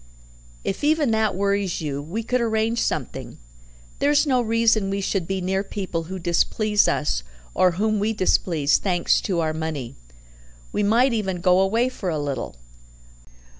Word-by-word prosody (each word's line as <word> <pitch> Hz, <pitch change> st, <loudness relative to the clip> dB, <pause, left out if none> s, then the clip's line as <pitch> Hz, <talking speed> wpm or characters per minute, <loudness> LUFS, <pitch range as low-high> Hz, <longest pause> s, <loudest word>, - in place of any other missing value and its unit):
"If 195 Hz, -, -3 dB
even 300 Hz, -4 st, +2 dB
that 220 Hz, -2 st, +1 dB
worries 200 Hz, -1 st, 0 dB
you, 145 Hz, -3 st, -3 dB
we 180 Hz, +10 st, -4 dB
could 250 Hz, +2 st, 0 dB
arrange 225 Hz, 0 st, 0 dB
something. -, -, -3 dB, 0.6 s
There's 290 Hz, +1 st, +3 dB
no 255 Hz, -4 st, +2 dB
reason 225 Hz, -3 st, +2 dB
we 195 Hz, 0 st, -1 dB
should 190 Hz, -3 st, -1 dB
be 195 Hz, -1 st, -2 dB
near 190 Hz, +2 st, 0 dB
people 185 Hz, -5 st, -4 dB
who 190 Hz, +3 st, -6 dB
displease 205 Hz, +4 st, +2 dB
us 150 Hz, -, 0 dB, 0.3 s
or 180 Hz, -1 st, +3 dB
whom 215 Hz, +3 st, 0 dB
we 210 Hz, +2 st, +1 dB
displease, 170 Hz, -7 st, +2 dB
thanks 180 Hz, -3 st, +1 dB
to 180 Hz, -4 st, -1 dB
our 155 Hz, -1 st, -1 dB
money. 155 Hz, -6 st, -4 dB, 0.8 s
We -, -, -1 dB
might 235 Hz, +5 st, +3 dB
even 190 Hz, -5 st, -2 dB
go 180 Hz, +1 st, +4 dB
away 225 Hz, +6 st, +2 dB
for 210 Hz, -7 st, -4 dB
a 160 Hz, -, -1 dB
little." 140 Hz, -, -4 dB
195 Hz, 160 wpm, -23 LUFS, 170-220 Hz, 0.8 s, go